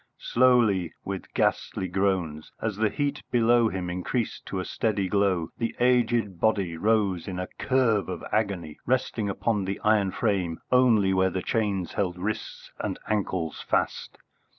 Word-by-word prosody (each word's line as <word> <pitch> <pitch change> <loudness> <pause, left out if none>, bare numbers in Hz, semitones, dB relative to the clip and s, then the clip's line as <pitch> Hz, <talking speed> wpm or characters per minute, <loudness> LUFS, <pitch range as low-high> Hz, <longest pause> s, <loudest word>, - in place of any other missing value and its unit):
Slowly, 115 -9 +3
with 95 -1 -5
ghastly 95 - 0
groans; 90 -5 -1
as 110 -3 -2
the 110 0 +2
heat 145 +2 -2
below 120 -1 +4
him 95 -3 -4
increased 90 +7 -3
into 95 - -3
a 90 - -3
steady 105 -4 -1
glow, 95 -4 +1
the 115 -1 -2
aged 120 -6 +2
body 100 -6 +1
rose 100 -2 +1
in 95 -2 -4
a 90 - -2
curve 120 -8 +2
of - - -5
agony, 100 -8 -1
resting 120 -4 0
on 105 0 0
the 95 +1 -3
iron 105 -2 +3
frame 95 -6 -1
only 115 -7 +4
where 95 0 +3
the 95 0 -3
chains 100 -6 -1
held 90 -3 -1
wrists 100 +4 -5
and - - -3
ankles 95 -6 -1
fast. - - -1
100 Hz, 150 wpm, -26 LUFS, 95-115 Hz, -, below